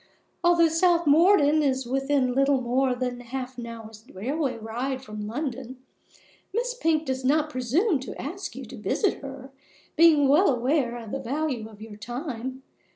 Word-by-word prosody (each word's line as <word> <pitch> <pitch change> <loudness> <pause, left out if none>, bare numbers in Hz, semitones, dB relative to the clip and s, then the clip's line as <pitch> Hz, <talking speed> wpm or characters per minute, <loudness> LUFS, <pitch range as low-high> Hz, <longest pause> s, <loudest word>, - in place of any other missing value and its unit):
Although 340 -1 +5
South 340 +1 +3
Morden 310 0 +5
is 265 -3 0
within 270 0 +1
little 275 +1 +3
more 255 +1 +1
than 245 -1 -3
half 255 +1 -6
an 235 - -6
hour's 225 -2 -10
railway 260 - -2
ride 245 +4 -4
from 210 -3 -6
London, 260 0 -5 0.7
Miss 485 +4 -1
Pink 320 -9 0
does 260 -1 -3
not 300 +3 +2
presume 290 - +1
to 260 - -8
ask 355 +7 -6
you - - -7
to - - -10
visit 405 - 0
her, 270 -1 -9 0.4
being 315 -4 +6
well 310 +8 +5
aware 250 -1 +1
of 225 -3 -9
the 275 - -2
value 265 -3 -3
of 215 -1 -13
your 215 -2 -10
time. 255 +2 -6
265 Hz, 160 wpm, -26 LUFS, 245-310 Hz, 0.7 s, being